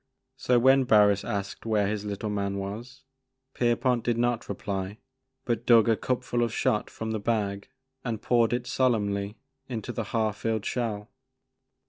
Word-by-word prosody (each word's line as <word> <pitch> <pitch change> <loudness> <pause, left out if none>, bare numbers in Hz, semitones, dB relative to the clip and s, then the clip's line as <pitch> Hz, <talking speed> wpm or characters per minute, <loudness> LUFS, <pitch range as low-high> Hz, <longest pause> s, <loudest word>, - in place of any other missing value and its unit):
So 125 - +2
when 130 +2 +5
Barris 105 -3 +5
asked 100 -1 -4
where 110 -2 +1
his 105 +1 -2
little 105 +1 -3
man" 100 -1 -2
was, 115 +7 -6 0.5
Pier 120 -1 +2
pont 125 -2 +1
did 120 -1 0
not 120 -1 0
reply 100 0 -4 0.5
but 120 -1 -2
dug 115 -2 +6
a 115 - +4
cupful 120 0 -1
of 120 -2 +1
shot 105 -1 0
from 110 0 -5
the 110 - -1
bag 100 -2 -1 0.3
and 115 -4 -3
poured 115 0 +2
it 120 0 -1
solemnly 105 -5 0 0.3
into 115 -5 -4
the 115 - -3
half 110 -1 -1
filled 110 -2 -2
shell. 110 -4 -3
110 Hz, 160 wpm, -27 LUFS, 100-120 Hz, 0.5 s, dug